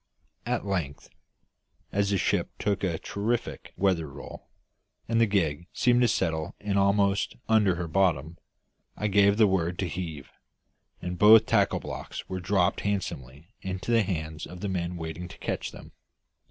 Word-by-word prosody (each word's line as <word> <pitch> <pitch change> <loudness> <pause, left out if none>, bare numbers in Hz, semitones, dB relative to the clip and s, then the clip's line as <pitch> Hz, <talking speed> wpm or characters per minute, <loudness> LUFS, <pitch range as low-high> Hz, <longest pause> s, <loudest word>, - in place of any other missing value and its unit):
At 120 -3 -1
length, 85 -8 -3 0.8
as 100 0 +1
the 100 - +2
ship - - 0
took 100 -1 -1
a 85 -4 0
terrific 110 +7 -3
weather 95 -5 +1
roll, 70 0 -10 0.6
and 115 0 +2
the 115 - +5
gig 85 -5 0
seemed 125 0 +3
to 120 - +5
settle 80 -8 -1
in 100 -1 -2
almost 100 0 +2
under 105 -5 +4
her 85 -1 -4
bottom, 85 -2 +1 0.6
I 105 - -3
gave 100 0 +4
the 110 - +6
word 90 -3 0
to 95 - -1
heave, 80 -4 -6 0.7
and 90 0 -4
both 110 +1 +8
tackle - - +2
blocks - - -7
were 95 - -4
dropped 95 0 +1
handsomely 80 -7 -4
into 95 +4 -4
the 115 -1 +5
hands 80 -5 -4
of 90 0 -10
the 100 - -2
men 90 -1 -2
waiting 80 +1 -6
to - - -12
catch - - -3
them. - - -12
95 Hz, 160 wpm, -27 LUFS, 85-100 Hz, 0.8 s, both